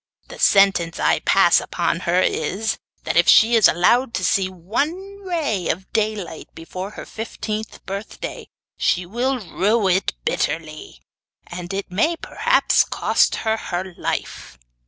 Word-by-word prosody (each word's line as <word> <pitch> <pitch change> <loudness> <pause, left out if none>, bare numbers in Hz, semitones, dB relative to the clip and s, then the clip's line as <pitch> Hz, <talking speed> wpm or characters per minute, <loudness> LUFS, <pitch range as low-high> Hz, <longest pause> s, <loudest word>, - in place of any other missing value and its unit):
The - - -10
sentence 195 -4 +3
I - - +2
pass - - +4
upon 165 - -2
her 180 +1 +3
is, 195 +7 -1 0.2
that - - -2
if 175 - +4
she 225 +2 +6
is 225 - +7
allowed 235 +8 +2
to 185 - -1
see 185 +2 +2
one 295 - -3
ray 315 - -2
of 185 +3 -4
daylight 210 -7 -2
before 185 +4 -7
her - - -7
fifteenth 220 -1 -6
birthday 200 +2 -6 0.3
she 180 0 +1
will 245 +8 -1
rue 210 +1 0
it 185 - +1
bitterly, 155 0 -3 0.4
and 175 +1 -7
it 195 -1 -4
may 265 - +1
perhaps 475 +8 +2
cost - - +1
her 220 0 +2
her 185 -3 -5
life. - - -4
195 Hz, 140 wpm, -21 LUFS, 175-230 Hz, 0.4 s, is